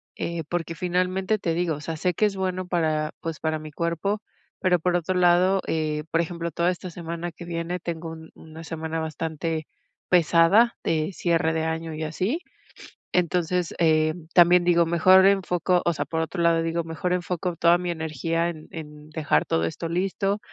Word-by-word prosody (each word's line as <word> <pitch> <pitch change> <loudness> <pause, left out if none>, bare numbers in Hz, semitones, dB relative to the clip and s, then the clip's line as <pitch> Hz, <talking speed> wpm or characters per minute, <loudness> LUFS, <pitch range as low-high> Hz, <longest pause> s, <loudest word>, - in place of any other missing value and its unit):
eh, 170 -2 -4
porque 165 -1 -3
finalmente 185 +4 0
te 165 -3 -1
digo, 170 -1 0
o 145 - -9
sea, 160 +1 -4
sé 180 +3 0
que 215 - +2
es 200 -2 -1
bueno 185 -1 -2
para, 155 -3 0
pues, 165 -1 -5
para 160 -1 -1
mi 155 -1 -10
cuerpo, 170 +6 -1 0.4
pero 180 -1 +3
por 175 +2 +1
otro 175 +1 0
lado, 180 +2 +4
eh, 155 -1 -1
por 165 - +2
ejemplo, 170 0 -4
toda 170 +3 +1
esta 185 0 -6
semana 170 0 -6
que 175 - -10
viene 170 +1 -3
tengo 165 -1 -5
un 160 0 -10
1 160 +1 -12
semana 160 0 -4
bastante 160 0 -3 0.4
pesada 180 +6 +4
de 155 +2 0
cierre 170 -3 +1
de 160 0 -1
año 160 0 -3
y 155 +1 -4
así, 185 - -1 0.7
entonces, 180 0 0
em, 155 0 +2
también 175 0 +7
digo: 170 -1 +4
"Mejor 185 +3 +6
enfoco", 180 -2 +2
o 170 - +4
sea, - - -2
por 160 - -3
otro 170 +2 -2
lado, 165 -1 +3
digo: 165 +1 -1
"Mejor 165 +2 -3
enfoco 180 0 -2
toda 170 +2 +4
mi 175 0 -3
energía 165 +1 -1
en 155 -2 -10
en 150 -2 -9
dejar 150 - +1
todo 80 - +1
esto 85 - -3
listo, 195 +3 0
170 Hz, 185 wpm, -25 LUFS, 160-180 Hz, 0.7 s, también